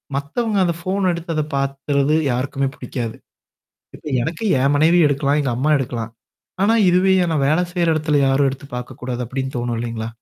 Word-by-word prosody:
மத்தவங்க 200 - -1
அந்த 170 -1 +1
ஃபோன் 190 +2 -1
எடுத்து 170 -1 -5
அத 155 - +1
பாக்கிறது 140 +1 0 0.2
யாருக்குமே 135 +2 -1
பிடிக்காது. 115 -4 -5 0.8
இப்ப - - -14 0.2
எனக்கு 165 - -4 0.2
என் 140 +1 +3
மனைவி 165 +4 +4
எடுக்கலாம். 140 +1 +1
எங்க 135 -3 -1
அம்மா 150 +5 +1
எடுக்கலாம். 115 -3 -4 0.5
ஆனா, 225 +3 +4
இதுவே 185 +2 +4 0.2
நான் 145 -3 +1
வேலை 160 +4 +3
செய்ற 175 -1 0
இடத்துல 150 -2 +1
யாரும் 135 +1 +3
எடுத்து 135 +1 -9
பாக்கக்கூடாது 125 0 -5
அப்பிடின்னு 130 +2 -4
தோணும் 120 -1 -2
இல்லேங்களா! 115 -1 -4
140 Hz, 165 wpm, -20 LUFS, 130-165 Hz, 0.8 s, மனைவி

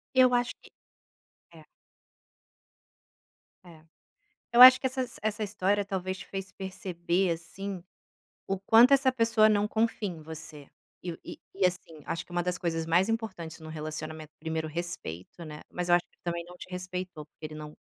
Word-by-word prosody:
Eu 255 -1 +6
acho 245 0 +1
que - - -17 0.8
é. 160 -1 -14 2.0
É. 165 -3 -15 0.7
Eu 240 - +7
acho 255 0 +12
que 260 - 0
essas 255 -2 -4
essa 215 0 -1
história 205 0 +1
talvez 190 -1 -3
te - - -9
fez 195 -1 -6
perceber, 185 -2 -1
assim, 180 +3 -5 0.6
o 195 -1 -1
quanto 230 +6 +6
essa 270 -1 +5
pessoa 230 -3 +4
não 205 -1 +3
confia 220 -2 0
em 165 -3 -7
você, 155 -2 -9 0.3
e 175 -2 -5
e - - -8 0.2
e, 195 0 0
assim, 170 -4 -4
acho 165 0 -3
que - - -28
uma 175 0 +1
das 180 0 -1
coisas 165 -2 -1
mais 175 +5 +3
importantes 190 -8 -4
num 155 - -9
relacionamento 155 0 -6
1º 160 0 -2
respeito, 170 - -5
né, 150 -1 -9
mas 180 0 -3
eu 175 - +6
acho 175 - -1
que - - -34
também 170 -1 -3
não 180 +1 -13
te - - -10
respeitou, 180 -3 -5
porque 155 - -16
ele 155 - -10
não 150 0 -9
180 Hz, 170 wpm, -29 LUFS, 160-205 Hz, 2.0 s, acho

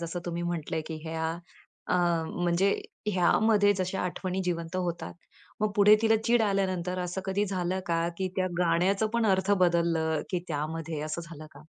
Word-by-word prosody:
जसं 170 +1 -4
तुम्ही 170 0 -3
म्हटलं 170 -2 -3
आहे 160 - -1
की 160 - -5
ह्या 160 0 -2 0.6
अं, 175 -2 +2 0.2
म्हणजे 175 +3 +3 0.4
ह्यामध्ये 205 +3 +4
जशा 185 +1 -1
आठवणी 185 +1 -2
जिवंत 170 0 -2
होतात, 175 -2 -3 0.5
मग 215 0 +1
पुढे 210 +1 +7
तिला 225 0 +4
चिड 235 -1 +3
आल्यानंतर 185 -3 0
असं 180 +1 -3
कधी 195 +2 0
झालं 185 -1 -1
का? 170 0 +1
की 190 -1 -1
त्या 185 0 +1
गाण्याचं 180 +5 +2
पण 235 -1 +2
अर्थ 190 0 +2
बदललं 165 -2 +1
की 180 - 0
त्यामध्ये, 155 +1 -3
असं 155 +2 -4
झालं 155 -2 -10
का? 145 +2 -14
175 Hz, 170 wpm, -28 LUFS, 165-190 Hz, 0.6 s, पुढे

